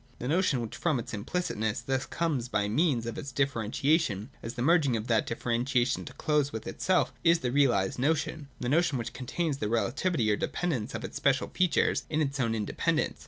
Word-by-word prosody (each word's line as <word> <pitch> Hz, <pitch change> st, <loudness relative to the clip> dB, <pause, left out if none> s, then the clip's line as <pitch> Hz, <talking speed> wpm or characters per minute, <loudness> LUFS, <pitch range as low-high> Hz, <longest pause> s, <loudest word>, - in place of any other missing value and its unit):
The 125 Hz, -, -5 dB
notion, 160 Hz, -4 st, +2 dB
which 115 Hz, -, -5 dB
from 155 Hz, -5 st, +1 dB
its 120 Hz, -, -5 dB
implicitness 110 Hz, -, -2 dB
thus 135 Hz, +1 st, -1 dB
comes 150 Hz, -8 st, -1 dB
by 105 Hz, -3 st, +1 dB
means 125 Hz, 0 st, +1 dB
of 115 Hz, -, -4 dB
its 140 Hz, -2 st, -6 dB
differentiation 135 Hz, -, 0 dB
and 115 Hz, -, -5 dB
the 120 Hz, -1 st, -6 dB
merging 145 Hz, -5 st, +3 dB
of 110 Hz, -, -4 dB
that 115 Hz, -2 st, +1 dB
diflFerehtiation 120 Hz, +2 st, 0 dB
to -, -, -8 dB
close 150 Hz, -2 st, +1 dB
with 110 Hz, -, -6 dB
itself, 185 Hz, -1 st, +1 dB
is 170 Hz, 0 st, +4 dB
the 125 Hz, -2 st, -1 dB
realised 125 Hz, -8 st, +2 dB
notion, 150 Hz, +1 st, 0 dB
— -, -, -31 dB
the 125 Hz, -, -3 dB
notion 150 Hz, 0 st, +2 dB
which 120 Hz, 0 st, -4 dB
contains 140 Hz, +3 st, -2 dB
the 105 Hz, -, -1 dB
relativity 115 Hz, -, +1 dB
or 105 Hz, -, +2 dB
dependence 135 Hz, -10 st, -2 dB
of -, -, -5 dB
its -, -, -5 dB
special 140 Hz, -1 st, +1 dB
features 180 Hz, -4 st, +2 dB
in 155 Hz, -, 0 dB
its 140 Hz, -2 st, -1 dB
own 115 Hz, -3 st, +1 dB
independence. 105 Hz, -2 st, -1 dB
130 Hz, 200 wpm, -29 LUFS, 115-155 Hz, -, is